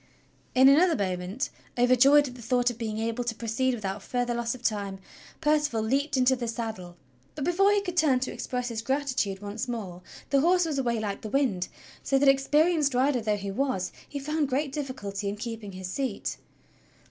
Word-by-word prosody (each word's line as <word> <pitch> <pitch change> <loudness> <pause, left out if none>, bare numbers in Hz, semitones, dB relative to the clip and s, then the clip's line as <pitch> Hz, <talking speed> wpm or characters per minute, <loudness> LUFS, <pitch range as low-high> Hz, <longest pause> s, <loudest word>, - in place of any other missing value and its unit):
In 260 +1 +7
another 320 +5 +6
moment, 190 +4 -2 0.3
overjoyed 255 +4 +5
at 250 - -8
the 245 - -12
thought 245 +1 +1
of 240 - -12
being 220 -2 -3
able 230 +2 -2
to 235 -1 -2
pro 230 - -7
ceed 255 +3 +1
without 200 -2 -4
further 245 +2 -1
loss 235 0 -1
of 250 - -14
time, 200 -4 -1 0.4
Percival 295 -7 +2
leaped 275 +5 0
into 260 +1 +4
the 240 -2 -4
saddle; 220 -7 -5 0.4
but, 290 - -4
before 385 +4 +4
he 410 -1 +3
could 360 -2 -5
turn 285 -6 +4
to 260 - -2
express 250 -1 -3
his 225 -2 -3
gratitude 255 -7 -1
once 210 +5 -4
more, 200 -7 -5 0.3
the 275 -1 +4
horse 355 +2 +4
was 300 -4 -1
away 235 -3 0
like 205 -2 -3
the 215 - -6
wind, 215 -9 +1 0.3
so 275 - +1
that, 280 +1 +3
experienced 290 +1 +3
rider 255 0 +2
though 210 -1 0
he 200 0 -5
was, 195 -5 -1 0.2
he 290 - -5
found 300 +1 -1
great 275 +2 0
difficulty 215 -9 -4
in 200 - -3
keeping 220 -2 -6
his 185 0 -6
seat. 255 +3 -3
245 Hz, 195 wpm, -27 LUFS, 215-275 Hz, 0.4 s, In